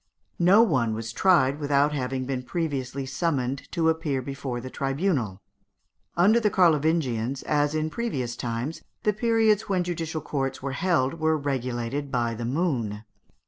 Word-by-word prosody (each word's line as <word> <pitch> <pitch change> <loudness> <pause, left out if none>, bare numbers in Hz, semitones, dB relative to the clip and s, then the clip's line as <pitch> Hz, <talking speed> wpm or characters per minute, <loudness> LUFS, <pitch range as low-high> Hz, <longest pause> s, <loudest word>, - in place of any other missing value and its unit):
No 190 +6 +6
one 130 - +1
was 115 0 -5
tried 150 -6 +3
without 145 0 +2
having 130 -2 -2
been 130 -1 -2
previously 135 -2 -3
summoned 135 -2 -2
to 165 -2 +1
appear 160 -4 0
before 135 -2 -4
the 130 +2 -8
tribunal. 135 - -1 0.7
Under 205 +7 +5
the 215 -2 +2
Carlovingians, 150 - +2
as 145 0 +1
in 155 0 -1
previous 130 - -3
times, 120 +6 -4 0.2
the 210 - +2
periods 220 -1 +2
when 185 -2 +1
judicial 165 -2 -3
courts 135 -2 -2
were 135 0 -4
held 165 -1 0
were 160 0 +2
regulated 135 0 -3
by 120 -2 0
the 115 +1 -4
moon. 120 - -1
140 Hz, 145 wpm, -26 LUFS, 125-165 Hz, 0.7 s, No